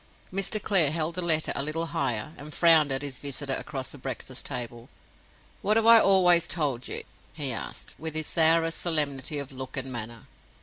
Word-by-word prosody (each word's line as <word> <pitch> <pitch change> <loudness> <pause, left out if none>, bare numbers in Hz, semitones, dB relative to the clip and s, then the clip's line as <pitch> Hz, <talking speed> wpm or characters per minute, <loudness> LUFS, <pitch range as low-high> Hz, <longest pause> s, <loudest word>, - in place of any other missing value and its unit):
Mr. 195 +3 +1
Clare 190 -8 +3
held 160 +2 -2
the 180 - -2
letter 160 -2 +2
a - - -1
little 155 +3 -2
higher, 155 -4 -2
and 150 +1 -8
frowned 160 -4 +5
at 135 +1 -1
his 135 -3 -5
visitor 140 -1 -4
across 135 -2 -5
the 145 - -10
breakfast 130 0 -6
table. 120 -3 -6 0.7
"What 215 +2 +2
have 225 - +2
I 230 0 +9
always 180 -4 +5
told 140 -8 -1
you?" - - -5 0.3
he 140 -5 -1
asked, - - -7
with 160 0 -5
his 155 0 -1
sourest 165 +1 +3
solemnity 150 -3 -1
of 140 -1 -5
look 130 0 -8
and 135 0 -3
manner. 115 -1 -7
150 Hz, 185 wpm, -27 LUFS, 135-165 Hz, 0.7 s, I